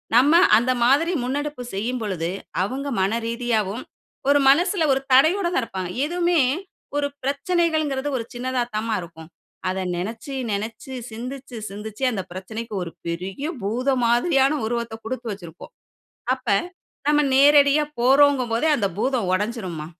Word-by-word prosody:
நம்ம 270 Hz, +6 st, +6 dB, 0.2 s
அந்த 240 Hz, +3 st, +2 dB
மாதிரி 290 Hz, +8 st, +3 dB
முன்னெடுப்பு 285 Hz, 0 st, -3 dB
செய்யும் 235 Hz, +6 st, -2 dB
பொழுது, 175 Hz, -5 st, -2 dB, 0.3 s
அவங்க 265 Hz, +8 st, -3 dB
மன 195 Hz, +2 st, +2 dB, 0.2 s
ரீதியாவும் 230 Hz, -2 st, -1 dB, 0.5 s
ஒரு 285 Hz, 0 st, +5 dB
மனசுல 345 Hz, +4 st, +3 dB
ஒரு 265 Hz, -, 0 dB
தடையோட 330 Hz, +8 st, +5 dB
தான் 265 Hz, -, +2 dB
இருப்பாங்க. 190 Hz, -5 st, -5 dB, 0.2 s
எதுவுமே 345 Hz, +1 st, +1 dB, 0.6 s
ஒரு 290 Hz, 0 st, +1 dB, 0.2 s
பிரச்சனைகள்ங்கிறது 300 Hz, -1 st, 0 dB
ஒரு 230 Hz, -, -5 dB
சின்னதா 250 Hz, 0 st, -1 dB
தாம்மா 220 Hz, +1 st, -1 dB
இருக்கும். 165 Hz, -2 st, -11 dB, 0.4 s
அத 190 Hz, +1 st, -2 dB, 0.2 s
நெனச்சு 225 Hz, +9 st, -5 dB, 0.2 s
நெனச்சு 220 Hz, +6 st, -4 dB, 0.2 s
சிந்திச்சு 250 Hz, +2 st, -7 dB
சிந்திச்சு, 210 Hz, +4 st, -7 dB
அந்த 200 Hz, -, -2 dB
பிரச்சனைக்கு 220 Hz, +5 st, -7 dB
ஒரு 170 Hz, -, -7 dB, 0.2 s
பெரிய 185 Hz, +10 st, -4 dB, 0.2 s
பூதம் 250 Hz, +5 st, 0 dB
மாதிரியான 270 Hz, +4 st, +3 dB
உருவத்த 235 Hz, -1 st, -3 dB
கொடுத்து 240 Hz, 0 st, -4 dB
வச்சிருப்போம், 170 Hz, -4 st, -11 dB, 0.6 s
அப்ப 260 Hz, -1 st, -20 dB, 0.6 s
நம்ம 295 Hz, 0 st, +4 dB
நேரடியா 285 Hz, +1 st, +6 dB, 0.2 s
போறோங்கும் 270 Hz, 0 st, +4 dB
போதே 235 Hz, +8 st, +1 dB
அந்த 200 Hz, -3 st, +1 dB
பூதம் 245 Hz, -2 st, 0 dB
ஒடச்சிரும்மா. 185 Hz, -6 st, -2 dB
245 Hz, 130 wpm, -23 LUFS, 215-280 Hz, 0.6 s, நம்ம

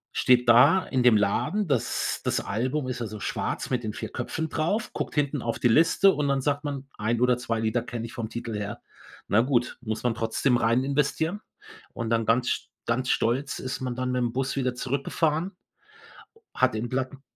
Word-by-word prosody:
Steht 125 Hz, -1 st, +4 dB
da 140 Hz, +10 st, +7 dB
in 130 Hz, -, 0 dB
dem 120 Hz, -3 st, +6 dB
Laden- 140 Hz, -, 0 dB
das 135 Hz, -6 st, -1 dB
das -, -, 0 dB
Album 130 Hz, +7 st, -2 dB
ist 125 Hz, -1 st, -4 dB
also 110 Hz, -2 st, -5 dB
schwarz -, -, -3 dB
mit 125 Hz, -2 st, 0 dB
den 110 Hz, -1 st, -3 dB
4 115 Hz, -2 st, -5 dB
Köpfen 160 Hz, 0 st, -3 dB
drauf- 185 Hz, +9 st, -1 dB
guckt -, -, -4 dB
hinten 145 Hz, -2 st, 0 dB
auf 115 Hz, -1 st, -2 dB
die -, -, +3 dB
Liste 165 Hz, -, +5 dB
und 145 Hz, -1 st, -1 dB
dann 135 Hz, -1 st, +1 dB
sagt 145 Hz, +2 st, -1 dB
man: 140 Hz, -2 st, -4 dB
„1 115 Hz, +2 st, 0 dB
oder 125 Hz, -1 st, +4 dB
2 115 Hz, -2 st, -2 dB
Lieder 115 Hz, +2 st, 0 dB
kenne 120 Hz, -1 st, -5 dB
ich -, -, -12 dB
vom 110 Hz, -2 st, -4 dB
Titel 115 Hz, -1 st, -5 dB
her.“ 105 Hz, 0 st, -5 dB, 0.5 s
Na 110 Hz, -, +4 dB
gut, 125 Hz, -1 st, 0 dB
muss 110 Hz, -3 st, -4 dB
man 120 Hz, -2 st, +1 dB
trotzdem 120 Hz, +2 st, +1 dB
reininvestieren. 140 Hz, -, +1 dB, 0.5 s
Und 115 Hz, -1 st, -4 dB
dann 115 Hz, -1 st, +2 dB
ganz 120 Hz, +2 st, +2 dB
st -, -, -2 dB, 0.2 s
ganz 125 Hz, +2 st, -1 dB
stolz 130 Hz, +5 st, 0 dB
ist 130 Hz, -, -4 dB
man 125 Hz, -2 st, -3 dB
dann 130 Hz, 0 st, -2 dB
mit 125 Hz, -, 0 dB
dem 120 Hz, -1 st, -1 dB
Bus 135 Hz, +1 st, -1 dB
wieder 130 Hz, -2 st, 0 dB
zurückgefahren. 150 Hz, +7 st, -1 dB, 1.0 s
Hat 130 Hz, -2 st, +2 dB
im 115 Hz, +2 st, -3 dB
Platten 130 Hz, +2 st, -3 dB
125 Hz, 195 wpm, -26 LUFS, 115-140 Hz, 1.0 s, da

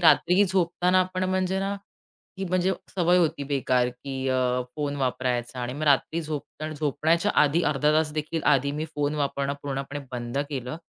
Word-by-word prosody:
रात्री 180 Hz, +3 st, +5 dB
झोपताना 180 Hz, 0 st, +2 dB
आपण 185 Hz, 0 st, -1 dB
म्हणजे 185 Hz, 0 st, 0 dB
ना 195 Hz, +1 st, -1 dB, 0.6 s
ही 195 Hz, -, -2 dB
म्हणजे 185 Hz, +1 st, +2 dB, 0.2 s
सवय 180 Hz, -1 st, +3 dB
होती 155 Hz, -4 st, +1 dB
बेकार 130 Hz, -3 st, +1 dB
की 130 Hz, +1 st, -5 dB
अ, 125 Hz, -1 st, +1 dB
फोन 145 Hz, -1 st, -2 dB
वापरायचा 125 Hz, -2 st, -1 dB
आणि 120 Hz, 0 st, -3 dB
मग 150 Hz, -, -6 dB
रात्री 150 Hz, +3 st, +2 dB
झोपताना 155 Hz, 0 st, -5 dB
झोपण्याच्या 155 Hz, +6 st, +1 dB
आधी 150 Hz, +4 st, +2 dB
अर्धा 150 Hz, +1 st, +2 dB
तासदेखील 155 Hz, +1 st, 0 dB
आधी 140 Hz, +1 st, +2 dB
मी 150 Hz, +2 st, -3 dB
फोन 145 Hz, 0 st, 0 dB
वापरणं 140 Hz, -1 st, -1 dB
पूर्णपणे 140 Hz, +1 st, -4 dB
बंद 120 Hz, +2 st, -3 dB
केलं. 130 Hz, 0 st, -4 dB
150 Hz, 160 wpm, -26 LUFS, 135-175 Hz, 0.6 s, रात्री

